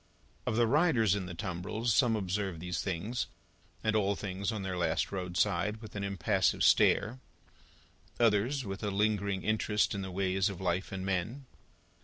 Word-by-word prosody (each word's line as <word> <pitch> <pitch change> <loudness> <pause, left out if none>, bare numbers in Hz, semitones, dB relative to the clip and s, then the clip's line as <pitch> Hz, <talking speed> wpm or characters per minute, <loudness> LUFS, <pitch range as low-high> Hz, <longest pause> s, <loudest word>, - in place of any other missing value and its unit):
Of 110 - +1
the 120 +1 +4
riders 125 - +3
in 100 -3 -2
the 90 - -6
tumbrils, 100 +6 -2
some 115 +3 +4
observe 95 -3 -2
these 90 0 -3
things, 100 +7 -2 0.6
and 110 0 +1
all 100 -1 +2
things 100 +1 -3
on 105 -3 -4
their 95 -1 -3
last 85 -2 0
roadside, 90 +2 0
with 110 -2 -11
an 100 - -3
impassive 100 -1 +1
stare; 120 +5 +4 1.0
others, 120 +4 +2
with 95 -1 -5
a 105 - -1
lingering 100 -1 0
interest 105 0 +1
in 100 - -3
the 95 - -5
ways 95 +1 +1
of 95 -3 -7
life 90 0 -1
and 95 -1 -4
men. 95 +9 -2
100 Hz, 165 wpm, -31 LUFS, 95-110 Hz, 1.0 s, the